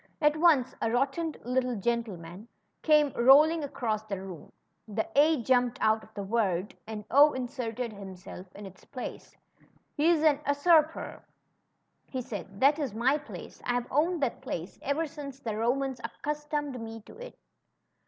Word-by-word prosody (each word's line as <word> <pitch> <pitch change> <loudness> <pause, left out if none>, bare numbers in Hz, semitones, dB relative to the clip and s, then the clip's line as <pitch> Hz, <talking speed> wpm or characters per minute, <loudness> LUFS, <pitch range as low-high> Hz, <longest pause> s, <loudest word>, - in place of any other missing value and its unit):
At 300 -1 +3
once 310 -6 +4
a 225 - +1
rotund 275 +7 0
little 250 0 0
gentleman 205 -4 -3 0.3
came 300 -3 +4
rolling 295 +6 +6
across 230 -6 -2
the 205 -3 -5
room; 185 -5 -9 0.4
the 220 +1 -2
A 295 -2 +4
jumped 250 0 +2
out 220 0 +2
of 220 - -17
the 200 - -4
word, 195 -3 0
and 215 -2 -6
0 290 +3 +7
in 260 -1 -2
serted 240 -2 -4
himself 190 -2 -10
in 205 - -9
its 190 -1 -13
place. 255 -3 -8 0.6
^^He's 320 0 +4
a 300 -3 +4
usurper," 310 +2 +2 0.8
he 260 - -4
said. 195 -4 -7
That 285 +5 +4
is 265 -8 -3
my 260 +6 +2
place. 295 - -10
I've 245 0 0
owned 320 +3 +1
that 260 - -1
place 180 -9 -6
ever 285 +4 0
since 290 -3 -8
the 225 -6 -4
Romans 260 +4 -1
accustomed 295 +1 -3
me 225 0 -7
to - - -15
it," - - -15
CHRISTOPHER'S - - -7
''AT - - -15
HOME. - - -35
250 Hz, 165 wpm, -29 LUFS, 220-295 Hz, 0.8 s, 0